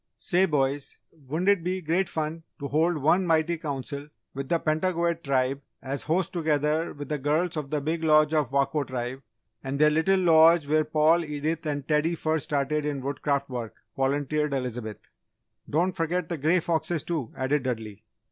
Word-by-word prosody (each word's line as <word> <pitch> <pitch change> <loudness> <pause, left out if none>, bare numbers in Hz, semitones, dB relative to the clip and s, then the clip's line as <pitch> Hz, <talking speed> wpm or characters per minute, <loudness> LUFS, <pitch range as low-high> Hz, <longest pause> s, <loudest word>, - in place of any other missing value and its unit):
"Say, 190 +1 +2
boys, 140 -2 -1 0.3
wouldn't 165 +8 0
it 200 -4 +3
be 185 +2 -1
great 175 +3 0
fun 160 +1 -3 0.2
to 140 - -5
hold 160 +4 +1
one 175 +6 +2
mighty 165 +1 +2
Council 140 -1 -5 0.2
with 135 0 -5
the 170 - +3
Pentagoet 170 +1 0
Tribe 135 0 0 0.2
as 135 +1 -4
host 170 +3 0
together 155 -1 0
with 145 -1 -8
the 150 0 -2
girls 155 +5 0
of 150 -3 -4
The 150 -1 -1
Big 160 +3 -2
Lodge 155 -1 +4
of 150 -5 +1
Wako 140 +2 +1
Tribe, 130 +1 -4 0.4
and 135 +1 -3
their 150 +1 +5
Little 185 +5 +3
Lodge 165 -2 +6
where 155 +1 +2
Paul, 155 +2 +3
Edith 155 +1 -3
and 145 -2 -3
Teddy 155 +2 +2
first 155 -2 -1
started 145 +1 0
in 145 -2 -2
Woodcraft 140 +1 -1
Work?" 120 -3 -5 0.2
volunteered 145 +2 0
Elizabeth. 125 -5 -4 0.7
"Don't 175 +5 +1
forget 165 +1 -1
the 170 -3 -3
Grey 165 +5 +3
Foxes, 165 -1 -1
too!" 155 -9 -3
added 135 +2 +1
Dudley. 110 -5 -5
150 Hz, 175 wpm, -26 LUFS, 140-165 Hz, 0.7 s, Lodge